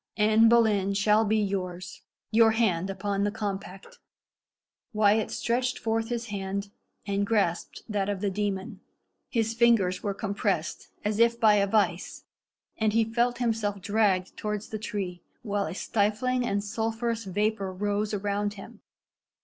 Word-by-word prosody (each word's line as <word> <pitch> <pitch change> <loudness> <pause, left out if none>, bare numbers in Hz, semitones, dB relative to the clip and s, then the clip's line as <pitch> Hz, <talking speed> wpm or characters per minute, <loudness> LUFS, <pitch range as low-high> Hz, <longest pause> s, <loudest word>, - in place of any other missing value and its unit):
"Anne 220 +1 +5
Boleyn 210 -4 +3
shall 210 +2 +4
be 220 0 +1
yours. 185 -3 -3 0.3
Your 225 0 +5
hand 195 -6 +1
upon 200 +1 -2
the 205 - +2
compact." 195 -2 -6 0.9
Wyat 215 0 +3
stretched 250 +2 -1
forth 225 0 -1
his 235 -1 -2
hand, 200 0 -4 0.3
and 200 0 0
grasped 200 -5 -1
that 205 -3 -1
of 200 -2 -2
the 200 0 -1
demon. 195 -1 -3 0.5
His 225 -2 0
fingers 230 -6 +3
were 200 -2 -2
compressed 200 -5 -2 0.2
as 210 +1 0
if 235 0 +4
by 220 -3 +6
a 200 0 +2
vice, 195 -4 0 0.6
and 215 -1 +2
he 230 0 +4
felt 240 +2 0
himself 220 -4 -1
dragged 200 -2 +1
towards 210 0 -4
the 215 - -4
tree, 190 -4 -4 0.2
while 205 -2 -1
a - - -6
stifling 230 +6 0
and 200 -1 -1
sulphurous 225 +2 -2
vapour 200 0 -1
rose 205 +2 -1
around 205 0 -1
him. 215 +2 -12
210 Hz, 145 wpm, -27 LUFS, 195-225 Hz, 0.9 s, by